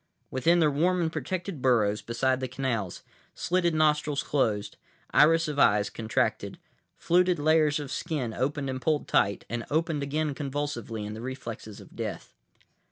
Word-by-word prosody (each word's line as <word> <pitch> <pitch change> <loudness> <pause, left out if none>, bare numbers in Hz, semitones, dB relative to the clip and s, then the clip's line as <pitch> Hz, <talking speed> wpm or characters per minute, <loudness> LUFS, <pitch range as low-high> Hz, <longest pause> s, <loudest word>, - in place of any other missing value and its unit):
Within 165 +7 +3
their 155 -3 +4
warm 175 +6 +2
and 160 -2 -1
protected 170 +2 -4
burrows 110 -5 +2
beside 130 +2 0
the 130 - -2
canals, 120 -7 -3 0.3
slitted 175 -2 +1
nostrils 150 -2 +2
closed, 110 -8 0 0.4
iris 165 +2 +5
of 150 -1 -3
eyes 105 -3 +4
contracted, 110 -1 -1 0.4
fluted 180 +1 +3
layers 155 0 +3
of 145 -2 -6
skin 130 -4 -3
opened 140 +2 -1
and 130 -1 -4
pulled 155 0 0
tight, 100 0 +1
and 120 +1 -3
opened 160 0 0
again 150 +1 -1
convulsively 140 -6 -4
in 105 - -5
the 110 - -7
reflexes 120 -4 -7
of - - -15
death. - - -5
145 Hz, 155 wpm, -28 LUFS, 120-155 Hz, 0.4 s, iris